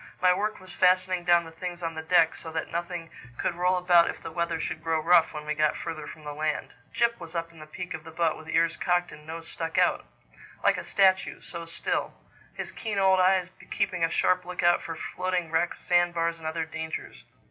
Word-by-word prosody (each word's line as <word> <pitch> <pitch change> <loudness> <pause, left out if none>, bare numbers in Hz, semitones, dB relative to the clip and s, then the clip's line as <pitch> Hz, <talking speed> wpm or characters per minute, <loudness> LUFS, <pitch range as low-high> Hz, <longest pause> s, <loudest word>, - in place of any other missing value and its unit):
My 180 0 +5
work 210 +3 -2
was 185 0 -13
fastening 185 -1 +3
down 175 -1 +5
the 165 - -10
things 175 +1 -6
on 165 0 -2
the 160 - -5
deck 160 0 +4
so 160 - -9
that 160 - -3
nothing 170 -1 -4 0.3
could - - -1
roll 180 +2 +2
about 175 -1 +5
if - - -5
the - - -8
weather 170 0 -1
should 160 0 -4
grow 165 -1 +1
rough 170 +2 +5
when 150 -1 -7
we 150 - -1
got 155 0 +1
further 155 -3 -5
from 155 - -10
the 150 0 -5
land. 155 +1 -2 0.2
Jip 235 0 +1
was 170 -1 -9
up 165 0 -3
in 165 - -16
the 155 - -10
peak 180 +3 -6
of 160 -1 -6
the 160 - -10
boat 160 -1 0
with 160 0 -11
ears 165 +1 +2
cocked 175 -1 +1
and 150 0 -13
nose 165 0 -7
stuck 165 -1 -4
out—like - - -1
a - - -4
statue, 190 -1 +2
so 170 -1 -8
still—his 165 - -5
keen 215 -3 -4
old 190 -1 +4
eyes 185 -1 +3 0.2
keeping 180 -2 -1
a 165 - +3
sharp 180 +2 +2
look 180 0 -5
out 175 0 +4
for 165 - -5
floating 180 -1 -2
wrecks, 165 +1 +1
sand 175 -1 +2
bars, 165 0 0
and 160 - -6
other 160 0 -2
dangers. 160 0 -6
170 Hz, 225 wpm, -27 LUFS, 160-180 Hz, 0.3 s, My